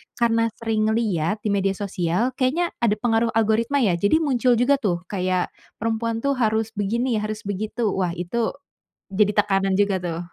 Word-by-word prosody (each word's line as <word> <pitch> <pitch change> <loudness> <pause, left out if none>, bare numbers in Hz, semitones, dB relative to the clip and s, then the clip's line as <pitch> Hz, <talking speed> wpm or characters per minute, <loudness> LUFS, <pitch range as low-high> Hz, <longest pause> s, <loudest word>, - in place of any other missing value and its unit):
karena 230 -1 +2
sering 220 -1 0
liat 205 -3 -1
di 215 - -1
media 195 -1 +1
sosial 195 +4 -1
kayaknya 320 +7 +1
ada 220 -3 +2
pengaruh 225 +1 +1
algoritma 225 +5 +2
ya, 175 -6 +2
jadi 205 - +3
muncul 250 -3 +2
juga 265 +4 +3
tuh 180 -7 -1
kayak 185 -2 -1 0.3
perempuan 230 +1 -1
tuh 280 - +2
harus 220 -1 +1
begini, 225 +3 -1
harus 215 +1 -4
begitu, 215 +4 -3
wah 180 -3 -1
itu 180 +7 -2 0.6
jadi 205 +1 +3
tekanan 195 -1 +1
juga 200 -1 +2
tuh. 165 -1 -3
215 Hz, 165 wpm, -23 LUFS, 195-235 Hz, 0.6 s, jadi